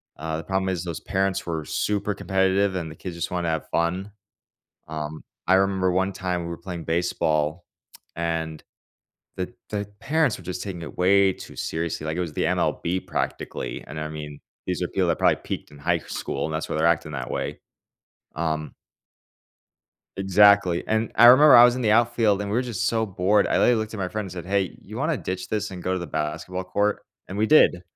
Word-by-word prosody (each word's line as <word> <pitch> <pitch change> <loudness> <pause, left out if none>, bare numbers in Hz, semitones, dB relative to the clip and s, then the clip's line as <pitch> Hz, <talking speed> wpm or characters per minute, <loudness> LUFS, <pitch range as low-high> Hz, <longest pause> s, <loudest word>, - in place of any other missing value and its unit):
uh, 80 +1 -4
the 80 - -6
problem 95 +2 -1
is 90 -2 -2
those 85 -3 -5
parents 95 0 -1
were 80 -2 -3
super 105 +4 -1
competitive, 95 0 +1
and 85 -3 -3
the - - -10
kids 90 +2 -7
just 85 0 -3
wanna 90 -2 -1
have 80 -1 -2
fun, 90 +5 -1 0.8
um, 75 0 -5 0.2
I 95 - +6
remember 95 -1 +2
one 95 +2 0
time 90 -2 -2
we 85 - -5
were 85 - -5
playing 85 -1 -6
baseball, 80 -1 0 0.5
and 80 -2 -3 0.7
the 95 +5 -4 0.2
the 105 -1 -2
parents 155 -4 +1
were - - -14
just 90 0 -4
taking 95 -4 -6
it 80 - -9
way 95 +1 +4
too - - -12
seriously, 80 -1 -3
like 80 +1 -2
it - - +1
was 85 -4 -4
the - - 0
MLB 90 +2 0
practically, - - -4
and, 80 - -7
I 75 0 -3
mean, 75 -2 -8 0.3
these - - -2
are - - -1
people - - 0
that - - +1
probably - - +4
peaked - - -5
in 75 - -14
high 85 +4 +1
school, - - -4
and 80 - -2
that's 80 - -3
why - - -2
they're 80 +1 +2
acting 85 -2 +1
that 65 -4 -5
way. - - -3 0.7
Um 80 -1 -2 1.4
Exactly, 95 -2 +5
and 110 +1 0
I 120 - +8
remember 130 +4 +9
I 120 - +10
was 120 0 +4
in 130 - -3
the 110 - +2
outfield, 115 -3 +3
and 100 0 -3
we 105 - 0
were 125 - +2
just 120 -6 -2
so 115 -1 +1
bored. 100 +1 +2
I - - +1
literally 125 - +5
looked 110 -1 -2
at 110 - -6
my 90 - -1
friend 110 +2 -3
and 95 - -8
said, 90 -1 -7
"Hey, 95 -3 0
you - - -10
wanna - - 0
ditch 95 0 -4
this 105 0 -2
and 90 -2 -8
go 95 - -1
to 95 - 0
the 85 - -5
basketball 80 +5 -3
court?" 105 +3 0 0.3
and 95 - -6
we 105 - +2
did. 110 -10 +5
90 Hz, 215 wpm, -24 LUFS, 80-100 Hz, 1.4 s, I